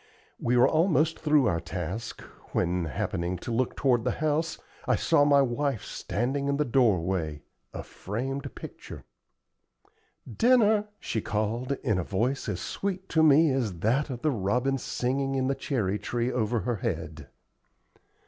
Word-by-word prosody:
We 125 +1 +1
were 120 - +6
almost 160 -1 +2
through 150 -3 +3
our 85 -7 +1
task 90 +6 -5 0.3
when, 90 0 0
happening 85 +4 -2
to 120 - -6
look 120 +2 0
toward 125 -4 +2
the 125 - 0
house, 155 +1 0 0.3
I - - +4
saw 145 - +3
my 140 -1 +5
wife 135 -2 -1
standing 130 +8 -2
in 140 0 +1
the 150 - +1
doorway, 95 - +1 0.3
a - - -6
framed 135 +7 -5
picture. - - -9 1.2
"Dinner," 215 - +3
she 110 - -2
called, 110 +6 -1
in 105 -8 +1
a - - -1
voice 115 +8 -1
as 95 -4 -2
sweet 190 -1 -4
to 160 - +3
me 155 0 +6
as 110 -11 -2
that 130 +8 +1
of 125 -2 -6
the 155 - +3
robin 125 +5 0
singing 135 +3 -1
in 130 -1 +1
the 135 - +1
cherry 115 -7 -1
tree 120 +4 -2
over 115 -1 0
her 120 +4 -1
head. 80 - -4
125 Hz, 155 wpm, -27 LUFS, 105-140 Hz, 1.2 s, were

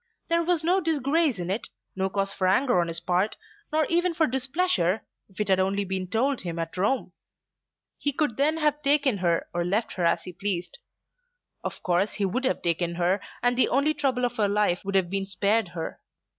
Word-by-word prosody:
There 335 0 +3
was 340 -2 +1
no 365 +4 +3
disgrace 310 - +1
in 180 0 -3
it, 205 - -2 0.3
no 190 0 0
cause 195 0 -1
for 185 - 0
anger 245 0 +3
on 170 - -1
his 165 0 -3
part, 185 +3 0 0.3
nor 310 0 +2
even 345 0 +1
for 320 - +3
displeasure 260 - 0 0.3
if 190 - -17
it 210 - 0
had 190 -1 +3
only 195 +2 +1
been 185 0 -3
told 250 +7 0
him 170 -2 -5
at 165 0 -4
Rome. 205 +8 0 0.9
He 290 - +2
could 285 -4 -1
then 300 +5 +2
have 300 -1 +1
taken 280 -6 +2
her, 170 -2 +1
or 175 0 0
left 200 +6 -1
her 180 - -3
as 170 0 +2
he 180 - -8
pleased. 180 - -2 0.8
Of - - -5
course 180 +3 +1
he 205 - -1
would 250 +8 -1
have - - 0
taken 170 0 0
her, 180 +3 +1 0.2
and 245 0 +3
the 255 - +3
only 280 +4 +2
trouble 265 -4 0
of 245 0 -3
her 210 -2 +3
life 205 -3 +1
would 195 0 -3
have 185 -2 +2
been 195 0 -2
spared 200 +2 +1
her. 165 -2 -6
205 Hz, 210 wpm, -26 LUFS, 185-280 Hz, 0.9 s, There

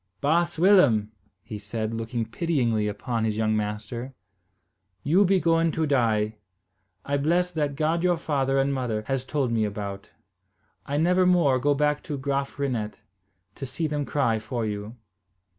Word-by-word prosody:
"Baas 170 +4 +1
Willem," 145 - +4 0.3
he 105 -1 -7
said, 110 +1 -4
looking 115 +1 -3
pityingly 120 -7 0
upon 110 +3 -2
his 110 -1 -1
young 110 -1 +1
master, 110 +5 -4 0.9
"you 175 +8 +4
be 190 +1 +3
going 165 -1 +2
to 160 - 0
die. 110 -6 +1 0.7
I 140 0 0
bless 175 +5 +1
that 150 -4 -1
God 160 +3 0
your 175 -1 +3
father 135 -4 0
and 135 +1 +2
mother 120 -5 -2
has 135 0 -1
told 135 -3 -1
me 115 -2 +1
about. 100 -1 -5 0.8
I 145 - -1
never 180 +3 +3
more 165 -8 +4
go 145 +2 +2
back 150 +1 +1
to 145 - -4
Graaf 140 +1 -2
Reinet, 120 -7 -3 0.5
to 135 - -6
see 165 +5 -3
them 150 -1 -1
cry 120 -7 +1
for 115 +2 -3
you." 105 +2 -5
135 Hz, 160 wpm, -25 LUFS, 110-155 Hz, 0.9 s, Willem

